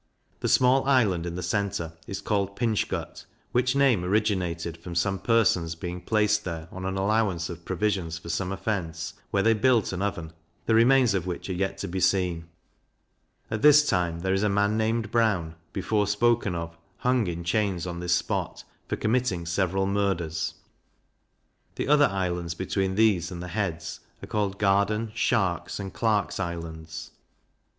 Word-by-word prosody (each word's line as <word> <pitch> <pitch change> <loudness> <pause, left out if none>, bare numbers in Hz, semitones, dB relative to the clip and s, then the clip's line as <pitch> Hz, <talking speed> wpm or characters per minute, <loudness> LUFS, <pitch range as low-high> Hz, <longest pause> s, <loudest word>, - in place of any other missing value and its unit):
The - - -1
small 130 +1 +4
island 105 -11 +2
in 85 - -4
the 90 - -4
centre 90 -3 -2
is 100 0 -5
called 100 -2 -1
Pinch 115 -2 0
gut, - - -5 0.3
which 130 +2 +2
name 135 -9 +3
originated 90 -4 0
from 85 +1 -9
some 95 +2 +1
persons 90 -8 +2
being 90 +1 -6
placed 105 0 +2
there 80 -2 -5
on 95 0 -6
an 95 0 -2
allowance 95 -4 +1
of 85 0 -10
provisions 95 -4 -1
for 85 - -12
some 90 +3 -1
offence, 85 -5 -3 0.2
where 100 -1 +1
they 115 - +5
built 115 -2 +2
an 90 - -3
oven, 90 -6 -3 0.3
the 115 - +2
remains 120 0 +5
of 95 -2 -1
which 90 +2 -4
are - - -1
yet 95 +2 -2
to 100 - -4
be 95 +1 -3
seen: 90 -3 +1 1.0
At 110 -1 -2
this 150 0 +7
time 85 -3 0
there 95 +1 0
is 95 - +1
a 105 - +2
man 100 +1 +2
named 110 0 0
Brown, 105 -9 +1 0.2
before 105 +1 0
spoken 105 -2 +2
of, 85 0 -5 0.2
hung 125 -4 +1
in 85 0 -4
chains 95 0 0
on 85 -1 -5
this 90 0 +2
spot, - - -2 0.2
for - - -1
committing 110 -7 0
several 95 +2 0
murders. 95 -5 -1 1.2
The - - -2
other 145 0 +5
islands, 90 -4 -2
between 95 +1 -1
these 100 -6 +3
and 90 - -7
the 90 +1 -6
heads, 90 -4 -3 0.2
are - - -6
called 100 -2 -1
Garden, 100 +2 +1
Shark's, 95 -7 0
and 95 -1 -6
Clark's 110 -4 0
Islands. 85 -3 -6
95 Hz, 170 wpm, -26 LUFS, 85-110 Hz, 1.2 s, this